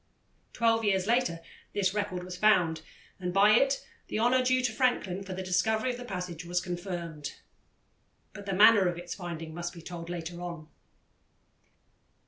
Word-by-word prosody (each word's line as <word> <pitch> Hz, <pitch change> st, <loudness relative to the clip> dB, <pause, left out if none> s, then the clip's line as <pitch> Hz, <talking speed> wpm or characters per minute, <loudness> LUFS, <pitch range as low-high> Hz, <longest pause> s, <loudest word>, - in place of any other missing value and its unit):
Twelve 225 Hz, -1 st, +2 dB
years 190 Hz, -3 st, +2 dB
later 230 Hz, -7 st, +1 dB, 0.3 s
this 195 Hz, -2 st, +1 dB
record 200 Hz, -4 st, -2 dB
was 180 Hz, 0 st, -7 dB
found, 180 Hz, -5 st, +3 dB, 0.4 s
and 180 Hz, -1 st, -2 dB
by 200 Hz, +3 st, +5 dB
it 270 Hz, +5 st, +3 dB, 0.2 s
the -, -, -3 dB
honour 245 Hz, +3 st, +3 dB
due 255 Hz, 0 st, +2 dB
to 245 Hz, -, +1 dB
Franklin 215 Hz, -6 st, 0 dB
for 190 Hz, -1 st, -6 dB
the 190 Hz, -, -4 dB
discovery 220 Hz, +7 st, +1 dB
of 245 Hz, -, -6 dB
the 245 Hz, -, -8 dB
passage 180 Hz, -5 st, -5 dB
was 175 Hz, +1 st, 0 dB
confirmed. 175 Hz, -4 st, -5 dB, 1.0 s
But 200 Hz, 0 st, -10 dB
the 195 Hz, -, -1 dB
manner 205 Hz, -1 st, +7 dB
of 175 Hz, -1 st, -1 dB
its 175 Hz, 0 st, -6 dB
finding 165 Hz, -3 st, -6 dB
must 175 Hz, +1 st, -4 dB
be 170 Hz, -, -10 dB
told 170 Hz, -1 st, -7 dB
later 175 Hz, 0 st, -5 dB
on. 170 Hz, -3 st, -7 dB
185 Hz, 165 wpm, -29 LUFS, 175-215 Hz, 1.0 s, manner